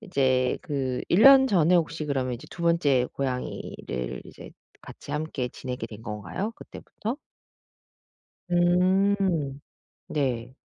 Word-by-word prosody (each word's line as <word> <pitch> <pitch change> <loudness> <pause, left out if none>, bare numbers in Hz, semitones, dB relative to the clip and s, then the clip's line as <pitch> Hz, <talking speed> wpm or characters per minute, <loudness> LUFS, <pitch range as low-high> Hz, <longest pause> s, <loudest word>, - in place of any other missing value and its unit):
이제 130 - +1
그 135 -5 -2
1 190 +6 +4
년 270 -1 +9
전에 180 -5 +3
혹시 160 -2 0
그러면 130 -3 -1
이제 120 - -10
2 170 - -8
번째 150 -7 +3
고양이를 125 - -4
이제 - - -12 0.3
같이 - - -11
함께 150 -4 -2
지내게 125 -2 -6
된 110 0 -11
건가요? 110 - -4
그때부터? 230 +6 -7 1.3
음 180 -4 +2 0.5
네. 130 -4 -2
150 Hz, 215 characters per minute, -26 LUFS, 130-180 Hz, 1.3 s, 년